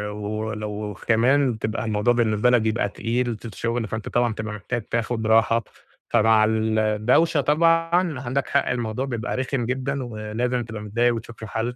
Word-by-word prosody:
ولو 105 0 -4
كمان 125 +3 +3
بتبقى 110 0 -3
الموضوع 110 +2 +2
بالنسبة 115 -1 +2
لَك 125 -2 +4
بيبقى 110 -1 0
تقيل 120 +2 -2
ت 115 - -9
ت 110 - -10
الشغل 115 0 -2
فأنت 110 0 -5
طبعًا 120 -1 +1
بتبقى 110 0 -5
محتاج 105 +4 -4
تاخُد 115 0 -2
راحة، 115 +1 +4 0.5
فمع 110 -1 +4
الدوشة 110 +7 +2
طبعًا 165 +1 +2
عندَك 130 +1 -2
حق 140 - +1
الموضوع 120 0 -2
بيبقى 120 -2 -3
رخم 130 -1 -1
جدًا، 130 +2 -2
ولازم 120 +2 -2
تبقى 110 -2 -7
متضايق 115 +3 +1
وتشوف 115 0 -9
له 110 - -6
حل 115 +3 -3
115 Hz, 165 wpm, -23 LUFS, 110-125 Hz, 0.5 s, لَك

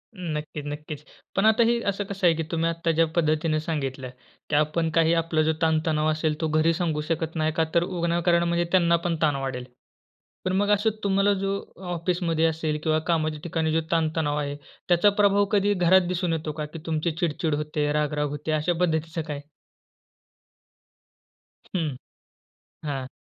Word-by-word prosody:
हं, 175 -4 -4
नक्कीच, 150 -1 -6
नक्कीच. 150 0 -6 0.3
पण 195 +3 +2
आता 220 +2 +5
ही 235 +1 +2
असं 205 +1 -4
कसं 195 -2 0
आहे 165 - +4
की 160 - -2
तुम्ही 165 0 +1
आता 165 0 -1
ज्या 165 +1 +3
पद्धतीने 155 -1 +1
सांगितल, 135 -5 -3 0.4
की 145 - +1
आपण 155 +2 +1
काही 165 0 +4
आपला 165 -1 +1
जो 160 +1 +2
ताणतणाव 155 -1 +1
असेल 155 0 0
तो 160 - +1
घरी 155 +2 +2
सांगू 160 -3 -1
शकत 160 +1 -2
नाही, 155 0 +1
का 160 0 +1
तर 170 - +5
विनाकारण 170 -1 +1
म्हणजे 170 0 +1
त्यांना 170 -2 +4
पण 170 -1 +1
ताण 150 -3 +3
वाढेल. 130 -2 -4 0.8
पण 185 - 0
मग 205 +1 +1
असं 210 +2 +3
तुम्हाला 200 +1 +3
जो 195 0 0 0.4
ऑफिसमध्ये 170 -1 0
असेल 155 -1 -1
किंवा 155 -1 +2
कामाच्या 155 -2 0
ठिकाणी 160 -2 -1
जो 165 +1 +2
ताण-तणाव 160 -2 +1
आहे, 145 -1 -3 0.3
त्याचा 175 +4 +5
प्रभाव 200 0 +4
कधी 205 0 +3
घरात 185 0 +5
दिसून 175 -1 -1
येतो 155 -1 -3
का? 150 0 -4
की 155 +2 -9
तुमची 160 +1 0
चिडचिड 160 -2 0
होते, 150 0 -1
राग-राग 150 -1 0
होते? 150 +2 -4
अशा 155 +3 +1
पद्धतीचं 160 -1 0
काय? 150 -2 -5 2.3
हं, 155 -7 -1 0.9
हां. 135 -3 -3
160 Hz, 170 wpm, -25 LUFS, 155-175 Hz, 2.3 s, आता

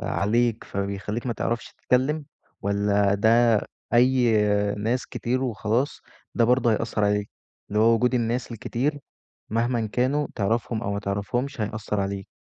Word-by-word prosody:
عليك، 115 +2 0
فبيخلّيك 100 +4 -4
ما 120 - 0
تعرفش 115 0 -3
تتكلم، 145 +4 0 0.4
والّا 100 0 +2
ده 115 +1 +4 0.3
أي 125 -1 +4 0.5
ناس 115 +4 -1
كتير 130 +2 -2
وخلاص 120 +2 -1 0.3
ده 120 - +3
برضه 120 -1 +3
هيأثر 110 -1 0
عليك، 105 0 0 0.4
اللي 105 +1 0
هو 115 +1 +5
وجود 125 +2 +2
الناس 120 +1 -1
الكتير، 135 +6 -2 0.5
مهمًا 115 0 0
كانوا 130 +7 0
تعرفهم 110 +1 -1
أو 100 -3 -2
ما 100 - -2
تعرفهمش 115 +7 -2
هيأثر 105 0 -2
عليك؟ 100 0 -3
115 Hz, 135 wpm, -25 LUFS, 105-125 Hz, 0.5 s, هو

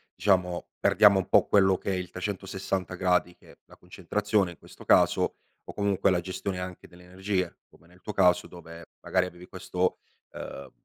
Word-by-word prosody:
diciamo, 90 -3 +1
perdiamo 100 -2 +5
un 95 - -3
po' - - +4
quello 95 -2 +4
che - - -4
è 95 - 0
il 90 -2 -4
360 95 0 -4
gradi 90 -1 +1
che - - -19
è - - -20
la - - -17
concentrazione 100 +2 -1
in 85 - -14
questo - - -15
caso, - - +3 0.3
o - - -10
comunque 100 -1 +1
la 90 -1 +1
gestione 95 +1 -4
anche 90 0 -8
delle 90 0 -17
energie, 95 0 -3
come 85 - -23
nel 90 +1 -21
tuo 105 - -7
caso 90 -2 +3
dove 85 -1 -12
magari 95 -1 +1
avevi 90 0 -11
questo, 90 -1 -2 0.3
ehm 70 - -8
90 Hz, 185 wpm, -27 LUFS, 90-95 Hz, 0.3 s, perdiamo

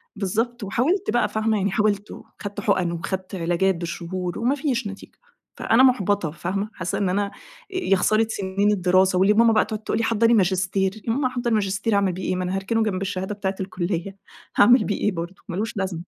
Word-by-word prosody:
بالضبط، 220 +4 -2
وحاولت 305 - 0
بقى، 240 - +2
فاهمة؟ 220 0 0
يعني 200 0 0
حاولت 210 -1 0
وخدت 205 -1 -8
حُقن 185 -4 +1
وخدت 185 +3 -4
علاجات 175 +2 +1
بالشهور 175 +1 -4
وما 250 +5 +1
فيش 265 -7 -1
نتيجة، 195 0 -10 0.4
فأنا 240 +4 +4
مُحبطة، 205 - +2
فاهمة؟ 195 +5 -3
حاسّة 180 -1 -3
إن 195 -2 0
أنا، 200 +2 +1
أ - - -11 0.4
يا 365 - +2
خسارة 215 +4 +2
سنين 200 0 0
الدراسة، 185 -1 +3
واللي 200 +2 +5
ماما 230 +1 +5
بقى 215 - +3
تقعد 215 0 -6
تقول - - -1
لي: 230 - 0
"حضّري 230 +1 +3
ماجستير." 190 0 +1
يا 225 - +2
ماما 265 0 +1
أحضّر 245 -1 -2
ماجستير 210 +1 0
أعمل 195 -3 +2
بيه 185 - -6
إيه؟ 185 - -1
ما 185 - -2
أنا 180 +1 -2
هاركنه 220 +4 0
جنب 195 -3 -2
الشهادة 195 +1 -3
بتاعة 195 -1 -2
الكلية، 185 0 -3 0.4
هاعمل 240 +2 +6
بيه 205 - -1
إيه 210 - +1
برضه؟ 170 +1 -5
مالوش 205 +3 -3
لازمة. 185 -4 -2
200 Hz, 195 wpm, -23 LUFS, 185-220 Hz, 0.4 s, هاعمل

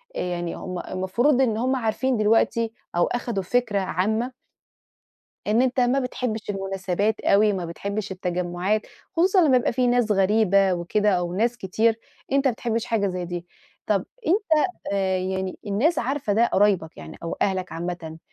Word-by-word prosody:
آآ، - - -2
يعني 175 -1 -3
هُم 180 -1 -5
المفروض 240 +9 +1
إن 225 -5 +2
هُم 255 +3 +1
عارفين 245 +1 0
دلوقتي، 225 +1 +2 0.2
أو 175 - +4
أخدوا 235 -5 -2
فكرة 225 -1 +1
عامة 220 +7 -1 1.1
إن 220 +4 +3
أنتَ 255 0 +1
ما 250 +2 +3
بتحبِّش 250 -4 -3
المناسبات 195 +1 -1
أوي، 210 +1 +4
ما 185 -3 -3
بتحبِّش 200 +4 -4
التجمُّعات، 180 +3 -1 0.3
خصوصًا 370 +3 +4
لمّا 260 -3 +5
يبقى 245 - +1
في 250 +1 +1
ناس 245 -3 +2
غريبة 195 -1 +3
وكده، 205 +4 +1
أو 175 -1 0
ناس 235 +5 +1
كتير، 225 +3 +1 0.3
أنتَ 275 0 +2
ما - - +1
بتحبِّش 230 0 -2
حاجة 215 -4 0
زي 180 -1 -3
دي. 175 0 -5 0.4
طب - - +1 0.2
أنتَ 345 -4 +3 0.3
آآ، 190 -1 +1
يعني 190 0 -3
الناس 230 - +1
عارفة 255 -3 -1
ده، 230 +3 +4
قرايبَك 190 -7 +1
يعني 80 - -10
أو 165 - -4
أهلَك 190 -2 -1
عامةً، 165 -1 -5
210 Hz, 160 wpm, -24 LUFS, 185-240 Hz, 1.1 s, لمّا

